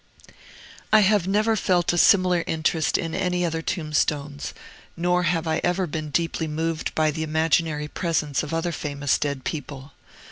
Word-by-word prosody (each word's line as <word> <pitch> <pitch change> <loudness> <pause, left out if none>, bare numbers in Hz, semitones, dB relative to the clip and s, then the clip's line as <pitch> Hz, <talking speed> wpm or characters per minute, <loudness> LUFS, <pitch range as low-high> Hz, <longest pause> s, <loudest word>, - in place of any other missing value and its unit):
I 215 0 +7
have 200 -2 +3
never 215 +3 +2
felt 180 -4 +1
a - - -1
similar 180 -3 +4
interest 160 -1 +1
in 165 -1 -4
any 180 -1 0
other 165 -1 -2
tombstones, 150 -3 -2 0.5
nor 180 +1 +1
have 170 -1 0
I 160 0 0
ever 180 +1 +1
been 155 -1 -5
deeply 165 +1 -1
moved 160 +1 -3
by 155 -1 +2
the 160 +2 -5
imaginary 160 -1 0
presence 155 -4 -1
of 150 - -6
other 165 +1 -1
famous 145 -3 -1
dead 140 -3 -2
people. 140 -2 -6
160 Hz, 155 wpm, -24 LUFS, 150-175 Hz, 0.5 s, I